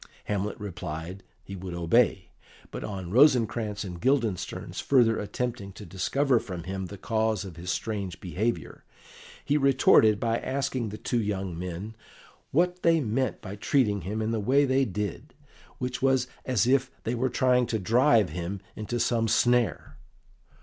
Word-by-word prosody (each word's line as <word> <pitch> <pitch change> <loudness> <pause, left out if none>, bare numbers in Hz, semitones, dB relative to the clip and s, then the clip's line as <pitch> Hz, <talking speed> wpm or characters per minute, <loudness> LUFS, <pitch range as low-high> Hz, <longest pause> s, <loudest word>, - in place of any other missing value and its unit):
Hamlet 105 +1 -2
replied 90 -2 -6 0.2
he 100 - -8
would 90 -1 -6
obey, 90 +3 +2 0.4
but - - -6
on 95 -4 -5
Rosencrantz 115 -5 +3
and 90 -3 -7
Guildenstern's 120 -7 -1
further 120 -5 +3
attempting 115 -1 -4
to 105 - -10
discover 125 +8 +1
from 90 -7 -7
him 95 +1 -4
the 100 - -9
cause 110 -1 0
of 90 -4 -9
his 85 +2 -7
strange 100 -3 -3
behaviour, 100 +7 -3 0.6
he 145 +1 +2
retorted 130 -6 +5
by 115 0 0
asking 130 -4 -2
the 105 - -7
two 120 +1 -1
young 95 -4 -3
men 90 +5 -6 0.5
what 180 +4 +1
they 165 -1 +4
meant 125 -2 -1
by 95 - -7
treating 105 -2 +1
him 105 +6 -3
in 110 - -1
the 115 - 0
way 135 +7 +3
they 135 0 +2
did, 105 -3 -5 0.4
which 125 -1 -4
was 130 -2 +2 0.2
as 125 -6 +2
if 130 +1 +2
they 115 - -1
were 125 +2 0
trying 125 0 +2
to 110 - -1
drive 115 +3 +3
him 90 +3 -4 0.2
into 115 +3 -3
some 115 -1 +1
snare. 120 +1 +1
110 Hz, 155 wpm, -27 LUFS, 95-125 Hz, 0.6 s, retorted